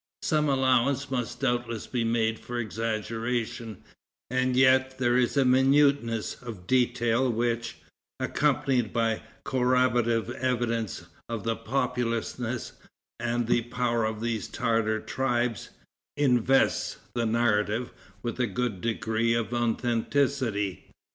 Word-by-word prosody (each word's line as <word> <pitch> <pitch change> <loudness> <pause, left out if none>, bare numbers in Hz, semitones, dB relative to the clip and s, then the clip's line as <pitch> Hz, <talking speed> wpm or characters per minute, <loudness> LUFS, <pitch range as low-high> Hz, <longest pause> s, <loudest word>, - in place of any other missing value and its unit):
Some 150 -1 +2
allowance 135 +1 +2
must 120 -1 -3
doubtless 120 -4 -1
be 125 -2 -2
made 115 -1 +1
for 120 - -6
exaggeration; 115 0 -3 0.5
and 130 0 +1
yet 130 0 +4
there 120 -2 +2
is 125 +2 +2
a 135 - +4
minuteness 130 -3 +3
of 110 -7 -8
detail 120 +1 +2
which, 120 0 -1 0.4
accompanied 135 -5 +1
by 115 -2 +1 0.2
corroborative 125 -3 +2
evidence 115 -7 -1 0.2
of 115 -3 -4
the 115 0 0
populousness 120 0 -2 0.5
and 120 0 0
the 120 +1 +2
power 120 -1 -1
of 110 0 -2
these 115 -3 -2
Tartar 110 -1 0
tribes, 120 -4 -1 0.5
invests 135 -2 +2 0.2
the 120 -1 0
narrative 110 0 +1 0.3
with 120 +1 -4
a 125 - +2
good 105 -1 -2
degree 115 0 0
of 115 0 -2
authenticity. 120 -2 0
120 Hz, 115 wpm, -27 LUFS, 115-130 Hz, 0.5 s, yet